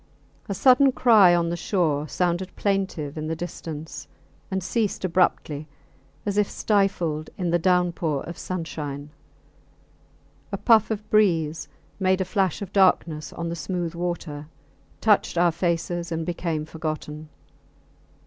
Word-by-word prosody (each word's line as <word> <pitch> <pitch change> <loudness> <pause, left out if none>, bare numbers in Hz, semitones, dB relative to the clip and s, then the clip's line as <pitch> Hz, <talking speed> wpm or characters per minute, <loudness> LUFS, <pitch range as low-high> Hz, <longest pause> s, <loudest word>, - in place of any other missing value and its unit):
A 200 - -1
sudden 265 +4 +5
cry 210 -9 +6
on 170 -1 +1
the 170 - -1
shore 160 -5 0
sounded 180 +3 -1
plaintive 190 -7 -1
in 155 - -4
the 160 - -2
distance, 160 -2 -7 0.4
and 190 -2 -2
ceased 210 -1 -1
abruptly, 160 -4 +1 0.6
as 205 0 0
if 205 - +2
stifled 180 -7 0
in 180 -3 -1
the 175 - +3
downpour 175 -4 +1
of 170 - -7
sunshine. 150 -5 -5 1.4
A - - -2
puff 220 -3 +4
of 215 -1 -4
breeze 165 -7 +2 0.3
made 190 -1 +2
a 190 - 0
flash 190 0 0
of 195 - -9
darkness 165 -6 +2
on 170 0 -4
the 170 - -3
smooth 175 0 -3
water, 170 -4 -4 0.5
touched 210 -5 +3
our 175 0 +4
faces, 170 0 -2
and 165 0 -2
became 165 -3 -2
forgotten. 155 -1 -5
175 Hz, 135 wpm, -24 LUFS, 160-190 Hz, 1.4 s, cry